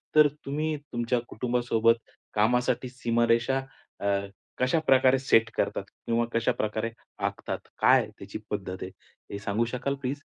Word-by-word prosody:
तर 150 -1 +8 0.2
तुम्ही 155 +3 -1 0.2
तुमच्या 120 +1 +1
कुटुंबासोबत 120 -1 +2 0.4
कामासाठी 125 +3 +2
सीमारेषा 120 +1 +2 0.4
अ, - - -5 0.5
कशाप्रकारे 130 -1 +4
सेट 115 -4 +4
करतात? - - 0 0.2
किंवा 115 0 +2
कशाप्रकारे 115 -2 0 0.4
आखतात? - - -3 0.2
काय - - +6
आहे - - -6
त्याची 100 +2 -7
पद्धत 95 -3 -4
आहे, 95 - -5 0.4
हे 100 - -4
सांगू 105 +2 0
शकाल 125 +3 -2
प्लीज? 140 +2 -2
120 Hz, 130 wpm, -28 LUFS, 115-130 Hz, 0.5 s, तर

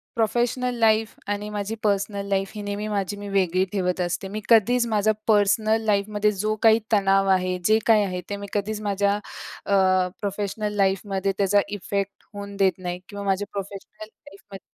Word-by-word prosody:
Professional 240 +2 0
life 220 -1 +2
आणि 205 +1 -3
माझी 205 +1 -3
personal 200 -1 0
life 195 0 0
ही 210 - -5
नेहमी 205 +1 -3
माझी 205 -1 -2
मी 205 - -7
वेगळी 185 -2 +2
ठेवत 180 -2 -1
असते. 180 +2 -2
मी 215 +1 -4
कधीच 235 +2 +4
माझा 215 -1 +2 0.2
पर्सनल 215 +1 +3
लाईफमध्ये 210 0 +1
जो 215 +2 -1
काही 225 0 +6
तणाव 195 -2 +3
आहे, 185 -1 +2
जे 215 +1 +4
काही 220 -2 +5
आहे 180 -2 -3
ते 205 - -2
मी 200 0 -7
कधीच 210 +1 -2
माझ्या 200 -1 +1 0.5
अ, 200 - 0 0.5
प्रोफेशनल 205 +1 -3
लाईफमध्ये 195 0 0
त्याचा 200 0 +3
इफेक्ट 200 0 -3 0.2
होऊन 200 0 -7
देत 195 -1 +4
नाही 180 -1 -5
किंवा 205 -1 -6
माझ्या 195 +1 0
प्रोफेशनल 200 +2 -7
लाईफध्ये 195 -2 -14
205 Hz, 165 wpm, -24 LUFS, 195-215 Hz, 0.5 s, काही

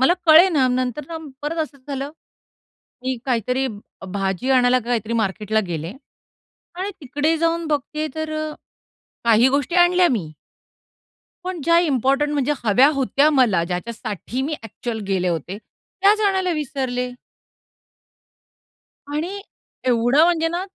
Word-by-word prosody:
मला 265 +7 +5
कळेना 315 -3 +6
नंतर 255 +2 -1
ना, 330 - -5 0.3
परत 310 +3 -3
असं 290 -2 -9
झालं. 275 0 -4 0.9
मी 260 0 -1
काहीतरी 250 +1 0
भ 205 -4 -9 0.3
भाजी 195 +5 -1
आणायला 255 -1 +4
काहीतरी 230 -2 -1
मार्केटला 215 -1 0
गेले 165 0 -4 0.8
आणि 380 +3 -3
तिकडे 295 +3 0
जाऊन 335 0 0
बघते 305 +1 -2
तर 315 0 -4
अ, 310 0 -3 0.7
काही 230 +2 +5
गोष्टी 280 +4 0
आणल्या 355 0 +5
मी 180 -11 -2 1.1
पण 365 -3 -4
ज्या 335 0 +5
इम्पोर्टंट 285 -2 +1
म्हणजे 290 0 +1
हव्या 240 +6 +5
होत्या 275 +2 +2
मला. 240 - +3
ज्याच्यासाठी 220 +6 -4
मी 300 +3 -2
ॲक्चुअल 225 +1 -5
गेले 185 -2 +1
होते, 175 +3 -3 0.4
त्याच 415 +2 +5
आणायला 380 -2 +1
विसरले. 260 -4 -3 2.0
आणि 355 +7 -3 0.4
एवढं 250 +4 +4
म्हणजे 330 -1 +2
ना, 345 +3 -3
270 Hz, 125 wpm, -21 LUFS, 230-315 Hz, 2.0 s, कळेना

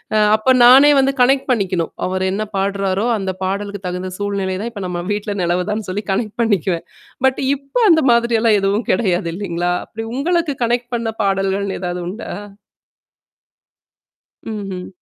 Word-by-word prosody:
அ - - +4 0.2
அப்ப 215 +4 -1 0.2
நானே 275 +4 +8
வந்து 270 +1 +2
கனெக்ட் 270 +2 +3
பண்ணிக்கணும். 185 -7 0 0.2
அவர் 185 0 -2
என்ன 205 +2 -2 0.2
பாடுறாரோ 195 +1 0
அந்த 190 -1 -2
பாடலுக்கு 200 +1 -3
தகுந்த 180 +1 -4
சூழ்நிலை 200 -2 -2
தான் 235 +1 -4
இப்ப 200 -3 -6
நம்ம 175 -1 -3
வீட்ல 205 0 -3
நிலவுதான்னு 180 +5 -1
சொல்லி 205 +3 -3
கனெக்ட் 210 +2 -2
பண்ணிக்குவேன். 190 -6 0 0.4
பட் 265 - +2 0.2
இப்ப 275 - -17
அந்த 320 -1 +5
மாதிரிெல்லாம் 235 -2 +3
எதுவும் 200 +4 0
கிடையாது 180 -4 0
இல்லைங்களா? 175 -2 -2
அப்டி 225 0 -7
உங்களுக்கு 330 0 0
கனெக்ட் 240 +1 -1
பண்ண 230 -1 -2
பாடல்கள்னு 195 0 -1
ஏதாவது 180 0 -3
உண்டா? 210 +6 -6 2.3
ம்ஹ்ம். 190 -3 -6
200 Hz, 145 wpm, -18 LUFS, 185-235 Hz, 2.3 s, நானே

